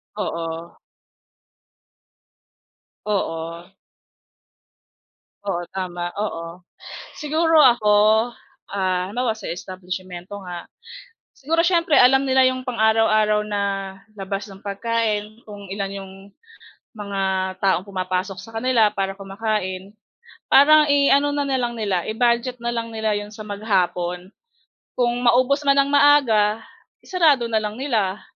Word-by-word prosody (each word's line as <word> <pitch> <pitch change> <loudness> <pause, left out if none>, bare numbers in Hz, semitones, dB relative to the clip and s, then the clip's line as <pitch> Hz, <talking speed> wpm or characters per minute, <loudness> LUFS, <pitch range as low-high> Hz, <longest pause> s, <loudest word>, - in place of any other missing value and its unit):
Oo. 165 -4 -5 2.3
Oo. 170 -3 -3 1.7
Oo, 175 -3 -2
tama, 175 -2 -4
oo. 170 -3 -5 0.5
Siguro 315 +1 +3
ako? 235 -5 +4 0.7
Ah, 185 -2 -1
halimbawa 240 -3 -1
sa 205 - -8
establisimyento 185 +1 -7
nga, 175 -1 -8 0.7
siguro 320 +4 -2
siyempre 335 -5 +3
alam 265 +2 +6
nila 265 -1 +3
'yong 255 0 0
pang-araw-araw 220 -3 +2
na 205 -1 -3 0.5
labas 195 +1 -5
ng 195 -1 -13
pagkain, 215 +1 -2
kung 205 -2 -11
ilan 195 -1 -3
'yong 195 -1 -8 0.8
mga 200 -2 -5 0.4
taong 190 0 0
pumapasok 185 +1 -3
sa 225 +4 -11
kanila 225 -2 +2
para 195 0 -3
kumakain. 195 0 -4 0.6
Parang 305 +2 +7
i 280 -1 +4
ano 285 +1 +3
na 285 -1 -1
lang 240 -1 -1
nila, 200 -6 -2
i-budget 240 +2 0
na 235 - -3
lang 230 -1 -4
nila 220 -1 -1
'yon 205 +1 -6
sa 215 - -12
maghapon. 185 -4 -2 0.7
Kung 245 0 0
maubos 255 +4 +3
man 275 - +5
nang 275 0 +2
maaga, 250 -7 +4 0.4
isarado 300 -10 +2
na 220 - +1
lang 210 -1 -2
nila 220 -7 -1
215 Hz, 115 wpm, -22 LUFS, 190-250 Hz, 2.3 s, Parang